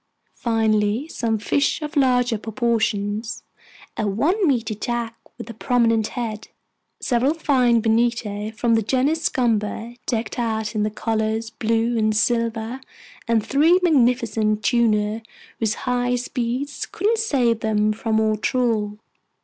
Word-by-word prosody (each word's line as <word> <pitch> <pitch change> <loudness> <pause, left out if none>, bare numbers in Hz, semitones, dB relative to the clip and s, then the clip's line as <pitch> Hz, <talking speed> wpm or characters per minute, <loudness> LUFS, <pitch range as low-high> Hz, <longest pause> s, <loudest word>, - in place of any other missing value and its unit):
finally, 220 +2 0
some 230 -8 -1
fish 250 +7 0
of 300 +2 -6
larger 250 -4 +3
proportions: 220 -1 -1 0.5
a 215 - -1
one 330 - +1
meter 235 -5 0
jack 230 +1 -3 0.2
with - - -8
a 230 - -7
prominent 230 -1 +1
head, 220 -3 -4 0.5
several 260 +5 +1
fine 250 -7 +2
bonito 220 -2 0
from 230 +1 0
the 225 - +3
genus 270 +8 +1
Scomber 230 -1 -1
decked 230 0 -2
out 220 -2 -2
in 215 - -1
the 210 - +1
colors 220 +1 -2
blue 230 +1 0
and 215 -1 +1
silver, 230 +2 0 0.5
and 230 -2 +1
three 320 +6 +4
magnificent 235 - +2
tuna 220 -2 +1 0.4
whose 220 -1 0
high 245 0 +1
speeds 250 +3 -3
couldn't 445 +2 0
save 250 - +1
them 215 -1 +1
from 220 0 0
our 220 -1 +2
trawl. 215 -3 0
230 Hz, 130 wpm, -22 LUFS, 220-245 Hz, 0.5 s, three